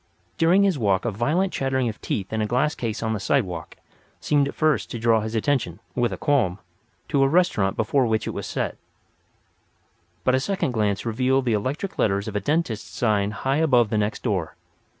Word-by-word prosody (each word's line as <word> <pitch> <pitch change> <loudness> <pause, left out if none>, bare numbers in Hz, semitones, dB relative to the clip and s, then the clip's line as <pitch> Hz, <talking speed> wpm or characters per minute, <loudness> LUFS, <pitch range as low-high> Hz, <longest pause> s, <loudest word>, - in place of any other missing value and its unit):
During 180 +5 +5
his 190 -7 +2
walk 100 -3 +1
a 120 - 0
violent 155 - 0
chattering 130 -2 0
of 110 -2 -5
teeth 100 +1 -3
in 110 - 0
a 105 - 0
glass 135 +7 +1
case 115 -2 -4
on 110 0 0
the 110 - -2
sidewalk 95 -7 -1 0.4
seemed 145 -2 +2
at - - -6
first 155 -3 +1
to - - -5
draw 115 -1 +3
his 110 +1 -4
attention 110 - 0
(with 120 +1 0
a 95 - -4
qualm), 125 - +1 0.5
to 140 - +2
a 135 - +5
restaurant 135 - +2
before 120 +3 +2
which 110 -1 0
it - - -2
was - - -5
set; - - -3 1.5
but 130 - +3
a 130 - +3
second 165 -1 -1
glance 105 -3 0
revealed 130 +3 +1
the 120 - +1
electric 135 - -3
letters 100 0 +1
of 105 - -5
a - - +2
dentist's 135 - -1
sign 105 -4 +1
high 135 +6 -1
above 125 -8 +3
the 110 - +1
next 105 +1 -2
door. 95 -9 -1
120 Hz, 200 wpm, -24 LUFS, 105-140 Hz, 1.5 s, During